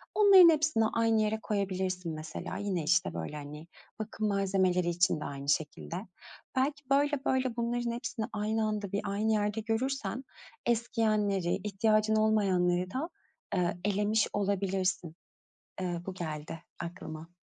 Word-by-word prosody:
Onların 390 Hz, -4 st, +9 dB
hepsini 305 Hz, -7 st, +3 dB
aynı 225 Hz, -1 st, +3 dB
yere 215 Hz, +1 st, 0 dB
koyabilirsin 185 Hz, -4 st, -2 dB
mesela. 155 Hz, +3 st, -6 dB
Yine, 195 Hz, -5 st, -2 dB
işte, 85 Hz, -, +2 dB
böyle, 85 Hz, -, -5 dB
hani, 150 Hz, +2 st, -8 dB, 0.3 s
bakım 215 Hz, 0 st, -2 dB
malzemeleri 190 Hz, -3 st, +2 dB
için 175 Hz, -1 st, +2 dB
de -, -, -5 dB
aynı 140 Hz, 0 st, -5 dB
şekilde. 155 Hz, +2 st, -1 dB, 0.6 s
Belki 285 Hz, +2 st, 0 dB
böyle 285 Hz, 0 st, +2 dB
böyle 260 Hz, -2 st, +1 dB
bunların 240 Hz, 0 st, -1 dB
hepsini 235 Hz, -1 st, -3 dB
aynı 215 Hz, +1 st, 0 dB
anda, 210 Hz, -2 st, -3 dB
bir, 200 Hz, -, 0 dB
aynı 210 Hz, +2 st, 0 dB
yerde 210 Hz, +1 st, 0 dB
görürsen 230 Hz, +1 st, -2 dB, 0.4 s
eskiyenleri, 215 Hz, -6 st, +1 dB
ihtiyacın 215 Hz, +1 st, +2 dB
olmayanları 185 Hz, -5 st, +2 dB
da, 290 Hz, -, -3 dB, 0.5 s
eee, 175 Hz, -1 st, 0 dB
elemiş 205 Hz, +1 st, +2 dB
olabilirsin. 195 Hz, -4 st, -1 dB, 0.7 s
Eee, 175 Hz, -2 st, -2 dB
bu 190 Hz, -, -4 dB
geldi 160 Hz, -2 st, -6 dB, 0.2 s
aklıma. 170 Hz, -1 st, -7 dB
205 Hz, 130 wpm, -30 LUFS, 180-225 Hz, 0.7 s, Onların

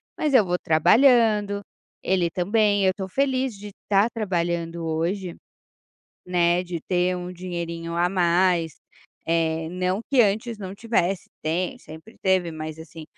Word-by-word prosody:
mas 300 Hz, -3 st, 0 dB
eu 215 Hz, -6 st, +6 dB
vou 180 Hz, 0 st, 0 dB
trabalhando, 210 Hz, -, +4 dB, 0.4 s
ele 180 Hz, -2 st, +1 dB
também, 205 Hz, +3 st, +1 dB
eu 190 Hz, -, +4 dB
estou 190 Hz, 0 st, -6 dB
feliz 260 Hz, -1 st, 0 dB
de 205 Hz, +1 st, -9 dB, 0.2 s
estar 200 Hz, +1 st, +3 dB
trabalhando 170 Hz, -5 st, -2 dB
hoje, 170 Hz, +3 st, -2 dB, 0.9 s
né, 175 Hz, 0 st, +2 dB
de 175 Hz, -2 st, -5 dB
ter 180 Hz, +1 st, 0 dB
um 180 Hz, 0 st, -5 dB
dinheirinho 170 Hz, -2 st, -5 dB
a 175 Hz, +1 st, +2 dB
mais, 175 Hz, -2 st, +2 dB, 0.5 s
eh, 160 Hz, -1 st, 0 dB
não 180 Hz, +3 st, -1 dB
que 265 Hz, -3 st, +6 dB
antes 220 Hz, +3 st, 0 dB
não 195 Hz, -2 st, -7 dB
tivesse 195 Hz, -4 st, -1 dB, 0.2 s
tem, 180 Hz, +10 st, -2 dB
sempre 160 Hz, 0 st, -13 dB
teve 185 Hz, -3 st, +2 dB
mas 155 Hz, 0 st, -7 dB
assim, 160 Hz, 0 st, -10 dB
180 Hz, 140 wpm, -24 LUFS, 170-205 Hz, 0.9 s, eu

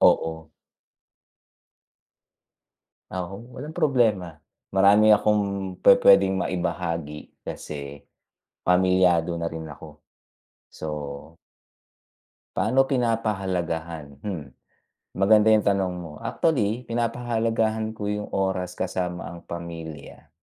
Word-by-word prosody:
Oo. 80 Hz, -1 st, +2 dB, 2.6 s
Oo, 95 Hz, +7 st, -7 dB
walang 150 Hz, +4 st, -7 dB
problema, 115 Hz, -, +1 dB, 0.3 s
marami 100 Hz, +3 st, +5 dB
akong 100 Hz, -2 st, +2 dB
pupuwedeng 95 Hz, -1 st, +6 dB
maibahagi 85 Hz, -4 st, -4 dB
kasi, 70 Hz, -1 st, -7 dB, 0.6 s
pamilyado 90 Hz, -2 st, +3 dB
na 85 Hz, -, -1 dB
rin 80 Hz, 0 st, -7 dB
ako. 75 Hz, 0 st, -11 dB, 0.7 s
So, 80 Hz, -, -7 dB, 1.6 s
paano 135 Hz, +1 st, +3 dB
pinapahalagahan? 95 Hz, -, -2 dB
Mm. 80 Hz, -9 st, -6 dB, 0.7 s
Maganda 105 Hz, +3 st, +5 dB
yung 110 Hz, -1 st, +4 dB
tanong 95 Hz, -2 st, +1 dB
mo, 85 Hz, -3 st, -7 dB
actually, 125 Hz, -7 st, 0 dB
pinapahalagahan 115 Hz, -2 st, -1 dB
ko 105 Hz, -, -4 dB
yung 105 Hz, 0 st, -3 dB
oras 95 Hz, -2 st, -2 dB
kasama 90 Hz, -1 st, -3 dB
ang 85 Hz, 0 st, -9 dB
pamilya. 80 Hz, -4 st, -8 dB
95 Hz, 85 wpm, -25 LUFS, 85-110 Hz, 2.6 s, pupuwedeng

